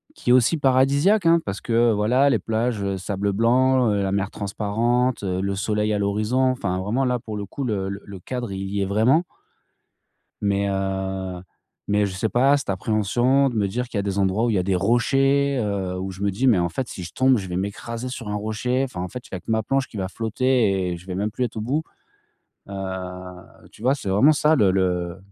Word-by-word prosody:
qui 120 - -1
est - - +7
aussi 130 +6 +4
paradisiaque, 140 +9 +3
hein, 170 0 +6
parce 100 0 -4
que, - - -6
heu, 115 0 +4
voilà 125 +7 +3
les - - +2
plages 110 -4 -1
sable 100 +1 -2
blanc, 125 +2 +3
heu, 100 -1 +1
la 95 - -1
mer 100 0 -1
transparente, 115 +5 -1
le 95 +1 -1
soleil 105 +1 0
à 105 - 0
l'horizon 105 +5 0
enfin 95 -7 -2
vraiment 115 +8 0
là, 125 -1 0
pour 110 -2 -6
le 100 - -4
coup, 140 +8 -6
le 100 -6 -2
le 100 -1 -8
cadre 120 +3 -5
il 95 0 -4
y 100 -1 -1
est - - +1
vraiment. 110 - +3 1.2
Mais 100 0 +1
heu, 95 -1 -3 0.4
mais 105 0 +2
je 95 - -5
sais 110 +3 -1
pas, 135 +4 +4
cette 140 - -3
appréhension 120 +7 +2
de 115 - -6
me 100 - +2
dire 125 +6 -3
qu'il 110 - -3
y - - +2
a - - -2
des 100 0 -2
endroits 100 +4 +1
où - - +1
il - - 0
y 95 - +2
a - - +1
des 95 0 0
rochers, 135 +6 +2
heu, 95 -3 -2
où 95 +1 -4
je 95 +2 -9
me 100 - +2
dis: 115 +8 -1
«Mais 110 -7 +5
en 85 - +1
fait 130 -2 -3
si 90 - -7
je 85 - -9
tombe 130 0 +3
je 95 -4 -3
vais 90 - -3
m'écraser 115 +5 -4
sur 125 -3 -6
un 105 - -2
rocher, 110 +5 -1
enfin 90 -9 -5
en 90 - -4
fait 125 - -7
il - - -33
y - - -3
a 90 - -7
que - - -9
ma 110 0 +2
planche 135 +4 0
qui 110 - -11
va 95 -1 -2
flotter 110 -4 +1
et 85 - -3
je 85 - -14
ne - - -21
vais 90 - -3
même 105 +3 -1
plus 125 +4 -2
être 115 - -5
au - - -2
bout». 135 +8 -1 0.9
Heu, 90 -2 -7
tu - - -17
vois? 130 +3 +3
C'est 100 -8 -5
vraiment 105 +11 +5
ça 150 +2 +3
le 100 -8 +4
le 90 -2 0
105 Hz, 240 wpm, -23 LUFS, 95-125 Hz, 1.2 s, est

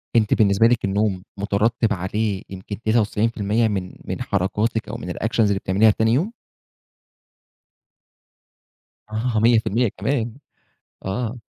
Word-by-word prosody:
أنتِ 110 -3 +4
بالنسبة 100 +1 +4
لِك 120 -2 +1
النوم 100 -1 0
مترتب 105 +3 +1
عليه 100 +2 -2
يمكن 95 +2 -7
99% 110 0 +1
من 95 -3 -3
من - - -4
حركاتِك 105 +4 -1
أو 110 - -4
من 115 - -7
الactions 115 +5 -3
اللي 100 -3 +3
بتعمليها 100 +4 +4
تاني 110 +2 +1
يوم؟ 170 - +1 2.8
آه 110 +1 -1
100% 115 0 +3
كمان، 115 +2 -1 0.7
آه. 110 +5 -2
110 Hz, 115 wpm, -22 LUFS, 100-115 Hz, 2.8 s, أنتِ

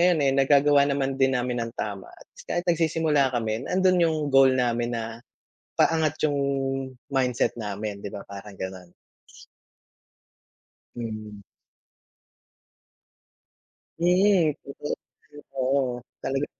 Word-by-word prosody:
ngayon, 175 -2 +4
eh, 135 - +3
nagagawa 140 +1 +5
naman 135 -1 0
din 135 -1 +4
namin 125 -1 -1
ng 115 - -7
tama 100 -2 -4
at - - -16 0.2
kahit 175 +1 -1
nagsisimula 160 -4 +2
kami, 110 +1 -2
nandun 185 0 +3
yung 165 -2 +3 0.2
goal 135 0 +7
namin 120 -1 0
na 115 - -3 0.7
paangat 160 -2 +2
yung 145 -2 0 0.8
mindset 125 -3 +1
namin, 105 -1 -4
'di 100 - -5
ba, 100 - -7
parang 100 0 -10
gano'n. 95 -2 -7 2.0
Mm. 110 -3 -6 2.6
Mm. 180 -2 +4
Kasi 140 +1 -5 0.4
ay, 145 - -10 0.2
oo. 130 -1 +1 0.2
Talaga 135 +2 -1
135 Hz, 110 wpm, -25 LUFS, 115-155 Hz, 2.6 s, goal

